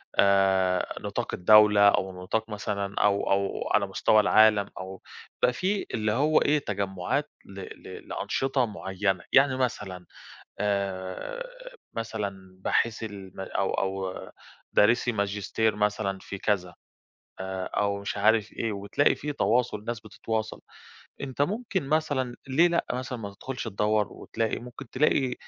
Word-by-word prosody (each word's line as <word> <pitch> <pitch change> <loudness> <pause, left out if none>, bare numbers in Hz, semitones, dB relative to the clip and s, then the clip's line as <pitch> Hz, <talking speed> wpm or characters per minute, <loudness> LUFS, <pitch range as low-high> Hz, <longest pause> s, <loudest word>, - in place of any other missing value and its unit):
آآ 95 -2 +3
نطاق - - -4
الدولة 105 +1 +7
أو 95 -2 -1
نطاق 110 +4 -1
مثلًا 100 -1 -3
أو 100 -1 +2
أو 100 0 0
على - - +3
مستوى 110 - +3
العالم 105 -1 +5
أو 95 0 -7 0.4
بقى - - +4
في 195 +10 -1
اللي 110 -1 0
هو 145 +7 +3
إيه، 150 +1 +3
تجمُّعات 100 +4 -2 0.2
ل 100 0 -10
ل 95 - -10
لأنشطة 135 -1 0
معيّنة؟ 95 -3 -2
يعني 135 -1 +5
مثلًا 100 -8 -3 0.5
آآ 100 - -2 0.5
مثلًا 100 -5 -5
باحثي 115 +3 0
الم 100 -3 -9
أو 95 0 -1
أو 95 -1 -2 0.6
دارِسي 120 +3 +4
ماجستير 105 +1 0
مثلًا 105 -2 0
في 100 - -7
كذا 95 -3 -1 0.6
آآ 95 0 -4
أو 100 +1 -1
مش 100 - -4
عارف 110 +1 +3
إيه، 115 - -2
وتلاقي 100 +8 +2
في 150 0 -4
تواصل، 110 -3 +1
ناس 120 -1 -3
بتتواصل. 110 -1 -4 0.6
أنت 140 0 -2
ممكن 195 - -1
مثلًا 140 -5 0
ليه 160 +7 +5
لأ 170 0 +1
مثلًا 125 0 -4
ما 100 -3 -7
تدخُلش 130 +5 -6
تدَوّر 105 0 +1
وتلاقي؟ 115 -1 -3
ممكن 125 +2 -10
تلاقي 130 -2 +2
105 Hz, 135 wpm, -27 LUFS, 100-125 Hz, 0.6 s, الدولة